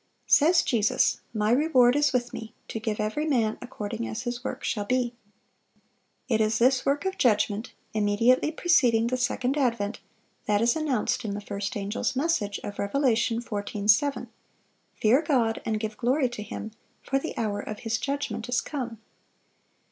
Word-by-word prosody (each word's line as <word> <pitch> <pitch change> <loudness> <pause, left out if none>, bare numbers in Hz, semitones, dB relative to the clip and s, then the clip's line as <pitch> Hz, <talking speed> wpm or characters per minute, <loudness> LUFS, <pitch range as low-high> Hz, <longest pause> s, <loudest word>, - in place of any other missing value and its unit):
Says 330 +4 +5
Jesus, 220 -3 +2
"My 215 -1 0
reward 255 -2 +4
is 290 -1 +3
with 245 -2 -1
Me, 225 -1 -8
to 225 - -4
give 220 -1 -3
every 215 +9 -1
man 230 -7 +1
according 225 -1 -5
as 225 +2 -5
his 240 0 -4
work - - -5
shall 205 - -1
be."(589) 250 +1 0 1.2
It 220 -2 +2
is 215 0 +2
this 255 +2 +3
work 285 +5 +1
of 380 0 -2
judgment, 210 -1 +1 0.2
immediately 220 +7 +3
preceding 250 -10 +3
the 245 +2 0
second 255 +2 0
advent, 235 -6 0 0.5
that 205 -1 +3
is 235 +2 +3
announced 280 -6 0
in 205 -2 -3
the - - -3
first 205 0 -4
angel's 205 +5 -2
message 255 -9 0
of 205 0 -7
Rev. 200 0 -3
14:7, 235 -1 +1 0.7
"Fear 235 +7 +4
God, 245 -8 +1
and 215 -1 0
give 215 0 -4
glory 255 +2 +1
to 240 -3 -7
Him; 215 +1 -6 0.3
for 270 - 0
the 320 - -6
hour 210 -3 -1
of 210 0 -6
His 225 -1 -1
judgment 255 -5 -3
is 245 - +2
come." 245 -6 -5
235 Hz, 165 wpm, -26 LUFS, 215-260 Hz, 1.2 s, Says